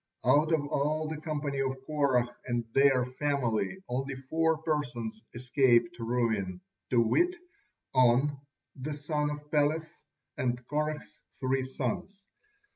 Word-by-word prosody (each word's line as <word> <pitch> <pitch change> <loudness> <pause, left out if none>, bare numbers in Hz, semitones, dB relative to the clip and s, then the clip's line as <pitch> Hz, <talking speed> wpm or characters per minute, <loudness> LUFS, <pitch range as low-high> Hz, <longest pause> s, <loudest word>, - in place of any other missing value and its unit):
Out 155 +3 +4
of 155 -3 +2
all 155 +2 0
the 155 -1 -5
company 145 -3 -2
of 135 -1 0
Korah 130 -5 +1
and 120 -1 -1
their 135 -2 +5
families 130 - -1
only 135 +2 -2
four 160 +5 +1
persons 120 -8 -2
escaped 120 -2 +3
ruin, 115 -6 0 0.3
to 120 - +3
wit: 350 - +3 0.6
On, 130 +3 +4 0.4
the 145 +3 -4
son 150 0 -1
of 150 0 -7
Peleth, 155 +2 +1 0.4
and 125 -1 0
Korah's 150 0 -3 0.2
three 130 0 0
sons. 130 - -3
135 Hz, 120 wpm, -30 LUFS, 125-150 Hz, 0.6 s, their